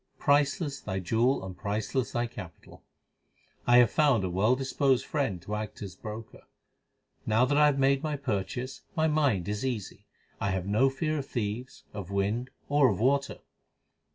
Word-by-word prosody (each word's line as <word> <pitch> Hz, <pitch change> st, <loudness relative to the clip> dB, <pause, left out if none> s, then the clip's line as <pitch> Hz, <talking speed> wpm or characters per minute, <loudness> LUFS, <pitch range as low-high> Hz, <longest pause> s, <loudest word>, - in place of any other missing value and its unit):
Priceless 145 Hz, 0 st, +1 dB
thy 95 Hz, -2 st, -4 dB
jewel 115 Hz, +6 st, +1 dB
and 95 Hz, -1 st, -7 dB
priceless 110 Hz, +6 st, -2 dB
thy 120 Hz, 0 st, 0 dB
capital. 95 Hz, -8 st, -11 dB, 0.8 s
I 120 Hz, 0 st, +7 dB
have 120 Hz, -2 st, +6 dB
found 140 Hz, -9 st, +3 dB
a 90 Hz, -, -2 dB
well 105 Hz, +8 st, +3 dB
disposed 135 Hz, 0 st, +1 dB
friend 135 Hz, -, -1 dB
to 105 Hz, -, -6 dB
act 105 Hz, 0 st, -4 dB
as 95 Hz, -3 st, -7 dB
broker. 110 Hz, +3 st, -8 dB
1 -, -, -23 dB, 0.8 s
Now 115 Hz, +3 st, +4 dB
that 145 Hz, -, 0 dB
I 150 Hz, 0 st, +6 dB
have 145 Hz, -2 st, +2 dB
made 135 Hz, 0 st, +3 dB
my 155 Hz, -1 st, -2 dB
purchase 125 Hz, 0 st, -3 dB
my 160 Hz, -1 st, +2 dB
mind 140 Hz, -, +1 dB
is 105 Hz, +2 st, -2 dB
easy. 105 Hz, -5 st, -4 dB, 0.3 s
I 100 Hz, -, 0 dB
have 95 Hz, -1 st, -1 dB
no 110 Hz, +7 st, +3 dB
fear 155 Hz, +3 st, -2 dB
of 135 Hz, -, -6 dB
thieves, 120 Hz, +2 st, -4 dB
of 100 Hz, -4 st, -6 dB
wind, 100 Hz, +6 st, -1 dB, 0.2 s
or 145 Hz, -2 st, +4 dB
of 100 Hz, -, -1 dB
water. 140 Hz, +4 st, +1 dB
120 Hz, 175 wpm, -29 LUFS, 105-140 Hz, 0.8 s, I